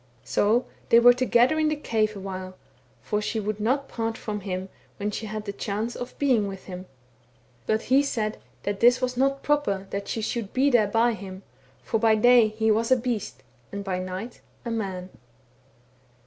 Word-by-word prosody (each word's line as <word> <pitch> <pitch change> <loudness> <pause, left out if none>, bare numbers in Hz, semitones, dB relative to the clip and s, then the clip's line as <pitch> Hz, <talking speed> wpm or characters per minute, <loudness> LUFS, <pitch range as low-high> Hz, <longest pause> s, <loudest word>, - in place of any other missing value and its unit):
So 205 - +2 0.2
they 230 - +7
were 245 +1 +8
together 250 +3 +3
in 310 - +3
the 305 - 0
cave 220 -7 0
awhile, 190 -1 -6 0.5
for 210 0 -1
she 220 +1 -2
would 210 0 -3
not 265 +6 0
part 225 -1 -3
from 210 -1 -4
him 185 -1 -4 0.3
when 205 +1 -2
she 215 +1 -5
had 215 0 -5
the 200 - -4
chance 210 +4 -3
of 245 - -7
being 250 -8 +2
with 195 -1 -7
him; 185 0 -8 0.8
but 220 0 +1
he 265 +3 +4
said 220 -6 -2 0.2
that 200 0 -2
this 245 +1 +5
was 255 -1 -1
not 275 +2 +1
proper 290 -10 0
that 200 0 -4
she 225 - -2
should 225 -2 -3
be 275 +2 +3
there 225 -4 +4
by 230 +3 +2
him, 190 -2 -9 0.4
for 225 - 0
by 220 -1 +4
day 240 +1 +6
he 220 +1 +1
was 225 +3 +1
a 260 - +6
beast, 235 -4 -4 0.3
and 200 0 -5
by 185 -2 -2
night 185 +6 -6 0.2
a 235 - -3
man. 190 -5 -4
220 Hz, 190 wpm, -25 LUFS, 200-245 Hz, 0.8 s, were